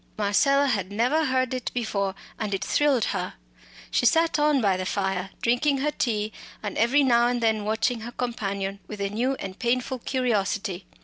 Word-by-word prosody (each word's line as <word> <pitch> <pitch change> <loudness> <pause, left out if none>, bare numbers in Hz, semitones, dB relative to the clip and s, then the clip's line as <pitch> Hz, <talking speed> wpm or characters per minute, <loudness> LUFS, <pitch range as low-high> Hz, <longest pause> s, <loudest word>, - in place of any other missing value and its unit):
Marcella 275 +8 +3
had 200 -8 -1
never 250 +10 +2
heard 255 -1 +1
it 255 -2 -2
before, 200 -5 -1 0.2
and 210 -2 -1
it 195 - -3
thrilled 280 -3 +2
her. - - -3 0.6
She - - +3
sat 325 -1 +3
on 295 -1 +3
by 200 -5 +2
the 185 - -2
fire, 190 -2 -1
drinking 260 +4 +2
her 295 +3 0
tea 215 -6 -1 0.3
and 205 - -4
every 270 +5 +3
now 240 -2 +4
and 245 0 0
then 220 -2 +1
watching 220 +3 0
her 230 +2 -7
companion 200 -5 -3
with 210 - -7
a 200 0 -2
new 250 +6 0
and 190 -5 -7
painful 250 +1 0
curiosity. 205 -7 -1
230 Hz, 180 wpm, -25 LUFS, 200-260 Hz, 0.6 s, now